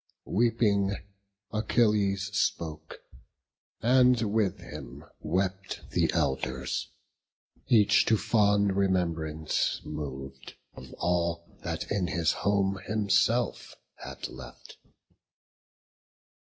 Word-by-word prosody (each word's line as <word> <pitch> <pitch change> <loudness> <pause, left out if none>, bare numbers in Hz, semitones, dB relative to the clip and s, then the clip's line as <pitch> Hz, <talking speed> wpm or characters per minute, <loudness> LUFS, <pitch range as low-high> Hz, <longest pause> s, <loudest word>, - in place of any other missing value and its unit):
Weeping, 100 -2 +2 0.6
Achilles 105 -3 +1
spoke; 80 -3 -2 0.8
and 125 0 +5
with 105 -5 +1
him 70 -5 -10
wept 95 +3 -3
The - - +2
Elders; 65 0 -1 0.8
each 105 -4 +5
to 110 - +4
fond 105 -2 +2
remembrance 85 -5 0
mov'd 70 -3 -7 0.2
Of 65 0 -12
all 85 -1 -1
that - - -4
in 100 -3 0
his 80 -2 +1
home 100 -1 0
himself 110 +3 +1 0.2
had - - -7
left. 65 -2 -12
95 Hz, 85 wpm, -28 LUFS, 80-105 Hz, 0.8 s, and